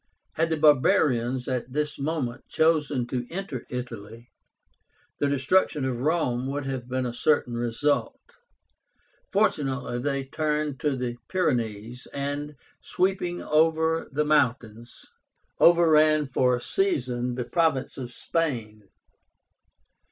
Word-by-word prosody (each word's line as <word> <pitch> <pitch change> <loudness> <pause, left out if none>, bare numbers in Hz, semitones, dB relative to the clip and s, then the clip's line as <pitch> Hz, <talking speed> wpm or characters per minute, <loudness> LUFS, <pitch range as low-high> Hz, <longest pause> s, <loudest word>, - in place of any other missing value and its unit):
Had 165 +1 0
the 160 - 0
barbarians 130 - +3
at 125 -1 -3
this 150 +1 -2
moment 140 -5 -3
chosen 150 -5 +1
to 125 0 -4
enter 170 -9 -5
Italy, 115 -2 -7 0.9
the 145 - +1
destruction 145 +1 +1
of 125 -2 -2
Rome 130 -5 0
would 140 0 -3
have 130 -2 -4
been 130 0 -2
a 120 - -3
certain 135 -1 +1
result. 120 +2 -2 1.0
Fortunately, 135 -3 0
they 140 +1 -1
turned 150 -1 -2
to 145 -2 0
the 125 -2 -4
Pyrenees, 120 - -2
and, 145 +1 -3 0.2
sweeping 180 -1 -1
over 160 +1 +2
the 150 +2 0
mountains, 120 -6 0 0.5
overran 155 -3 +5
for 125 -2 +2
a - - -4
season 125 - -1
the 125 -1 -3
province 160 -6 0
of 125 -3 -7
Spain. 115 - -3
135 Hz, 115 wpm, -26 LUFS, 125-155 Hz, 1.0 s, overran